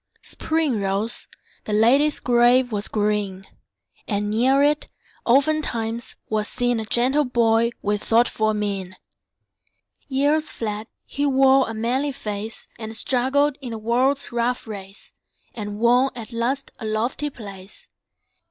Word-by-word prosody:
Spring 310 -9 -1
rose; 200 +4 0 0.4
the 210 - -3
lady's 265 +8 +4
grave 245 +1 +3
was 205 -1 -2
green; 205 -3 -1 0.6
And 205 -1 -1
near 260 +5 +3
it, 295 +1 +2 0.4
oftentimes, 240 -4 +1
was 215 0 -1
seen 245 -2 0
A 220 - -4
gentle 255 +6 +2
boy 235 -2 +2
with 205 0 0
thoughtful 220 -2 +2
mien. 195 -3 -3 1.1
Years 290 +3 +1
fled; 215 -1 -4 0.2
he 285 +1 -1
wore 270 -1 +4
a 225 - -5
manly 255 +6 -1
face, 210 -1 -5
And 220 0 -3
struggled 265 +4 +1
in 255 - -6
the 225 - -5
world's 250 +5 0
rough 240 +2 -1
race, 200 -2 -10 0.4
And 205 -2 -6
won 245 +4 +3
at 235 0 -8
last 255 +4 -2
a 225 - -6
lofty 235 +7 -1
place. 200 -6 -10
235 Hz, 130 wpm, -22 LUFS, 215-265 Hz, 1.1 s, lady's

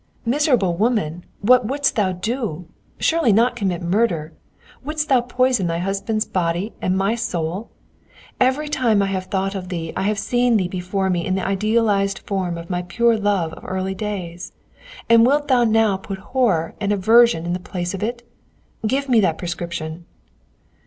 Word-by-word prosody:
"Miserable 250 - +2
woman, 190 -7 0 0.2
what 245 +2 +4
wouldst 280 +3 0
thou 200 -4 +1
do? 185 - -3 0.3
Surely 325 -8 +2
not 235 +4 +3
commit 190 -6 -2
murder? 170 -4 0 0.5
Wouldst 305 +2 -3
thou 260 -3 +5
poison 250 -5 +1
thy 165 0 -1
husband's 195 +4 -1
body 175 +3 -1
and 185 +1 0
my 195 +3 +1
soul? 180 -3 -3 0.7
Every 265 +4 +2
time 235 -8 +2
I 195 0 -1
have 185 -1 -2
thought 195 +1 -2
of 185 -2 -6
thee 165 -3 -4
I - - -1
have 205 +2 0
seen 240 +2 +2
thee 185 -3 0
before 185 +1 -2
me 175 -1 0
in 185 - -1
the 190 - -2
idealized 200 0 +1
form 185 -4 -2
of 170 0 -8
my 180 0 -2
pure 230 +6 +2
love 200 -6 0
of - - -11
early 190 +1 -3
days, 185 -4 -5 0.5
and 230 0 +6
wilt 290 +4 +2
thou 245 -2 +4
now 220 -3 +3
put 195 0 -7 0.2
horror 195 -12 +1
and 205 -1 0
aversion 220 -2 +4
in 175 - -1
the 180 - -2
place 180 -1 -4
of 195 - -5
it? 240 +2 -4 0.6
Give 275 +4 0
me 245 -4 +4
that 165 -6 +2
prescription!" 170 -1 -5
200 Hz, 175 wpm, -21 LUFS, 180-235 Hz, 0.7 s, and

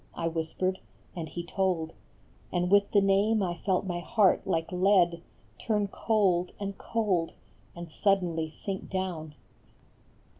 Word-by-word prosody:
I 165 - -2
whispered, 165 +3 -2 0.4
and 165 -3 -5
he 175 - -5
told; 175 -3 -1 0.6
And 180 0 0
with 200 0 +5
the 200 - +4
name 200 +2 +3
I 175 -2 -1
felt 190 +2 0
my 175 -2 -2
heart 195 +2 +2
like 165 -2 -1
lead 180 -2 +3 0.4
Turn 210 -3 0
cold 190 -5 +1
and 200 -1 -4
cold 195 -7 -1 0.4
and 170 -2 -8
suddenly 175 -5 +1
sink 190 +4 -6
down. 175 -5 -3
185 Hz, 135 wpm, -29 LUFS, 170-200 Hz, 0.6 s, with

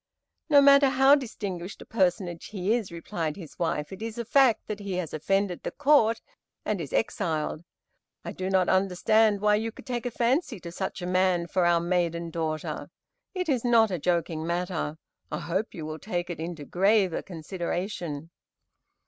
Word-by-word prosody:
"No 285 -2 +7
matter 280 0 +7
how 270 +1 +5
distinguished 200 -9 -2
a - - -20
personage 180 -4 0
he 200 0 -1
is," 225 -6 -1
replied 165 -2 -4
the 175 -5 -8
wife, 160 0 -1
"it 190 - -10
is 225 0 -5
a 235 - -3
fact 255 0 +4
that 210 -1 -5
he 200 -2 -5
has 180 -3 -3
offended 195 +3 0
the - - -3
Court 275 -6 +3 0.5
and 205 -5 -1
is 145 - -6
exiled. 160 -7 -1 0.6
I - - -4
do 185 0 -4
not 190 -2 +3
understand 195 +3 +3
why 210 0 +4
you 225 +1 -2
could - - -14
take 245 -1 -3
a - - -1
fancy 245 - 0
to 170 - -7
such 190 0 -4
a - - -2
man 185 -1 +2
for 175 0 +1
our 170 -1 +4
maiden 170 -1 -1
daughter. 155 -2 -3 0.5
It 365 -1 -2
is 260 -6 +1
not 230 -3 +4
a 180 - -2
joking 165 -1 0
matter. 170 -2 -2 0.3
I - - -2
hope 175 +7 -3
you 160 - -6
will 155 0 -6
take 175 -3 -3
it 170 - -6
into 165 -2 -5
graver 195 0 +2
consideration." 170 -2 -5
185 Hz, 180 wpm, -27 LUFS, 170-220 Hz, 0.6 s, No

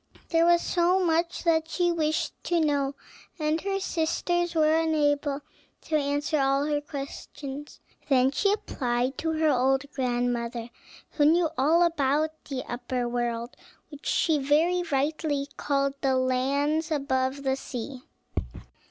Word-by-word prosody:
There 330 0 +3
was 345 0 +5
so 355 +1 +2
much 335 +1 0
that 320 -2 +2
she 350 -1 +1
wished 315 -1 0
to 345 -1 +2
know, 285 -3 +1 0.4
and 310 0 0
her 390 0 -1
sisters 345 0 -1
were 310 -1 +4
unable 290 -3 +1 0.4
to 315 - -2
answer 290 +1 0
all 275 +1 +2
her 295 -1 0
questions. 280 0 -7 0.3
Then 260 -1 +4
she 400 +8 +2
applied 255 - -1
to 320 0 -1
her 315 -1 +2
old 265 +1 +2
grandmother, 240 -2 -1 0.4
who 295 - +2
knew 325 +1 +4
all 315 +6 +4
about 310 -2 +1
the 265 -3 -4
upper 245 0 -3
world, 240 0 -2 0.3
which 290 -1 -10
she 315 -3 +2
very 315 +6 +2
rightly 285 0 0
called 275 -1 0
the 265 -1 +2
lands 280 +5 +1
above 275 -2 -1
the 265 -1 +1
sea. 255 0 -6
290 Hz, 135 wpm, -27 LUFS, 265-320 Hz, 0.4 s, was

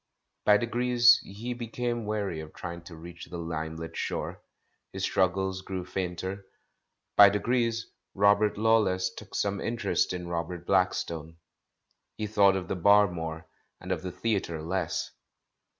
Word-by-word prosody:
By 105 0 +7
degrees 120 +1 +4
he 115 +5 -6
became 120 -1 -3
weary 100 -6 -2
of 80 0 -9
trying 85 0 -6
to 85 - -10
reach 85 +2 -10
the 85 - -7
limelit 80 0 -5
shore, - - -3 0.5
his - - -5
struggles 95 0 +1
grew 95 -1 -5
fainter; 95 +1 -4 0.7
by 100 -1 +10
degrees 115 +2 0 0.3
"Robert 100 +1 +4
Law 110 +1 +4
less" 95 -3 0
took 105 +1 -11
some 100 -1 -1
interest 120 0 0
in 90 -1 -4
Robert 85 0 -4
Blackstone. 85 -4 0 0.8
He 110 - -2
thought 100 -2 +4
of 95 -2 -3
the - - -2
Bar 100 +2 +5
more, 80 -1 -5 0.3
and 90 - -7
of 90 -4 -1
the 90 - -5
Theatre 95 -7 -2
less. 90 +1 -2
95 Hz, 145 wpm, -28 LUFS, 85-105 Hz, 0.8 s, by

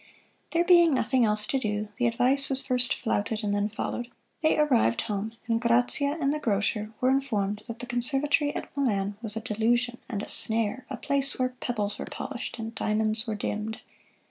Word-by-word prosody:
There 335 +1 +2
being 345 -4 +6
nothing 245 0 +2
else 210 0 0
to 270 - 0
do, 210 -2 -2
the 245 - +3
advice 255 +4 +2
was 270 0 +1
first 250 -2 +2
flouted 215 -1 -1
and 205 -1 0
then 205 +1 0
followed. 240 +3 -4 0.3
They 315 - +3
arrived 250 - +3
home, 210 +1 -3
and 230 -1 +1
Grazia 245 +5 +2
and 280 -1 +1
the 305 - -2
grocer 210 -2 0
were 255 +1 +3
informed 210 -7 0
that 230 -1 -6
the 245 - -7
Conservatory 270 +4 +2
at - - -6
Milan 205 -8 0
was 220 -2 -1
a 225 - -3
delusion 240 +3 0
and 210 -4 -3
a - - -6
snare 225 +3 +1
"a 265 - -4
place 275 +2 0
where 255 0 +1
pebbles 220 -5 -3
were - - -4
polished 250 -2 -6
and 225 0 -5
diamonds 215 +1 0
were 220 - -2
dimmed." 210 +1 -3
235 Hz, 190 wpm, -27 LUFS, 215-265 Hz, 0.3 s, being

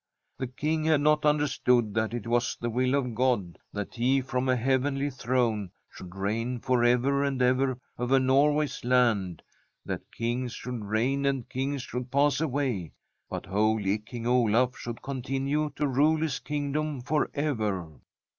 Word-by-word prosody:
The 130 - -2
King 155 +5 -1
had 155 -2 +3
not 150 0 +3
understood 125 -7 +2
that 110 0 0
it 120 -3 -4
was 120 +1 0
the 120 0 -2
will 130 +3 +1
of 125 -4 -1
God 115 -8 0
that 105 -1 -5
he 130 +3 +2
from 130 0 -2
a 130 - +4
heavenly 135 +3 0
throne 120 -6 0 0.2
should 90 0 -11
reign 115 +6 -2
forever 125 +3 +2
and 140 -2 -1
ever 130 +1 +2 0.2
over 125 +2 +3
Norway's 145 +3 +2
land, 115 -8 +2 0.4
that - - -5
kings 120 +1 -2
should 125 -3 -5
reign 120 +7 0
and 135 -3 -1
kings 135 0 -2
should 125 +1 -5
pass 140 +3 +2
away, 130 - -1 0.4
but - - -5
holy 105 0 +1
King 115 +2 -8
Olaf 125 0 +3
should 120 -1 -7
continue 135 +3 -1
to 150 - 0
rule 145 +4 +3
his 155 -5 -1
king 145 -1 -3
dom 150 -2 -2
for 150 +5 0
ever. 105 - -2
125 Hz, 155 wpm, -28 LUFS, 115-140 Hz, 0.4 s, a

